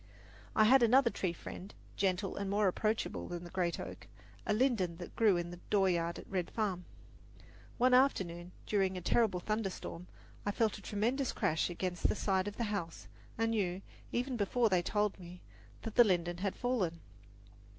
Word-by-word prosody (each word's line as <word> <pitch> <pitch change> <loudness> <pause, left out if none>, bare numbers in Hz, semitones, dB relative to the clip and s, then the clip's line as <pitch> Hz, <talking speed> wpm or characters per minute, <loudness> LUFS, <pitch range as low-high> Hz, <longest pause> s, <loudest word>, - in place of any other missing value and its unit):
I 215 - +6
had 255 +4 +6
another 240 +1 +5
tree 185 - -1
friend, 180 +3 -9 0.2
gentle 190 0 0
and 200 -1 -3
more 205 +1 +2
approachable 215 +4 -1
than 175 -1 -5
the 175 - -10
great 175 -2 -1
oak - - -8 0.4
a - - +2
linden 210 -7 +1
that 175 - -9
grew 210 -5 +4
in 175 0 -3
the 175 - -9
dooryard 175 -4 +2
at - - -10
Red 185 -3 -2
Farm. 195 -5 -2 0.9
One 255 +1 +4
afternoon, 180 -10 +2
during 190 -3 +1
a - - -5
terrible 195 0 +2
thunderstorm, 195 -3 -4 0.4
I - - -1
felt 215 +1 0
a - - -14
tremendous 235 +7 0
crash 160 +3 +1
against 175 0 -1
the - - +1
side 190 -2 0
of 205 - -5
the 235 - -1
house 170 -5 -4 0.3
and 225 0 +1
knew, 195 -4 -1 0.3
even 250 +1 -1
before 225 +3 +2
they 185 -3 +3
told 210 +2 0
me, 180 0 -10 0.4
that 225 - -5
the 240 - +8
linden 175 -4 +1
had 195 0 -1
fallen. 200 -10 -1
195 Hz, 175 wpm, -33 LUFS, 180-225 Hz, 0.9 s, the